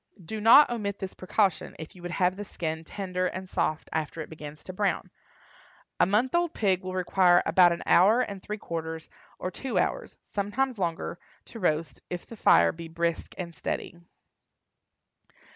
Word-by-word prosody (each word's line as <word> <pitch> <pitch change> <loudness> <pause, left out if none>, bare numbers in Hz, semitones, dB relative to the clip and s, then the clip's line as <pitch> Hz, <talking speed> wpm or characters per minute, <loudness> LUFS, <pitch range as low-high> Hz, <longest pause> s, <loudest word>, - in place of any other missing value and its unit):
Do 215 +5 -5
not 240 +6 +8
omit 205 -4 -2
this 190 -2 -6
precaution 190 0 0
if 160 +2 -9
you 180 - -13
would 175 - -5
have 180 -1 +2
the 205 - -5
skin 160 -4 -4
tender 185 +1 -2
and 185 +1 -5
soft 155 -3 -1
after 160 +1 -2
it 155 - -8
begins 150 -1 -9
to 185 - -8
brown. 200 +1 -1 0.9
A - - +5
month 220 +6 +2
old 345 -1 +1
pig 190 -4 +1
will 185 0 -5
require 180 -1 +4
about 175 +2 +6
an 170 - -3
hour 210 +7 +5
and 200 -5 -4
three 210 +2 -5
quarters 165 -3 -5 0.3
or 185 - -4
two 265 +7 -4
hours—sometimes 255 - -2
longer—to 170 +5 -5
roast, 155 -6 -1
if 175 -1 -5
the 230 - -10
fire - - +5
be 165 0 -9
brisk 170 0 -2
and 170 -2 -5
steady. 165 - -4
185 Hz, 165 wpm, -27 LUFS, 170-205 Hz, 0.9 s, not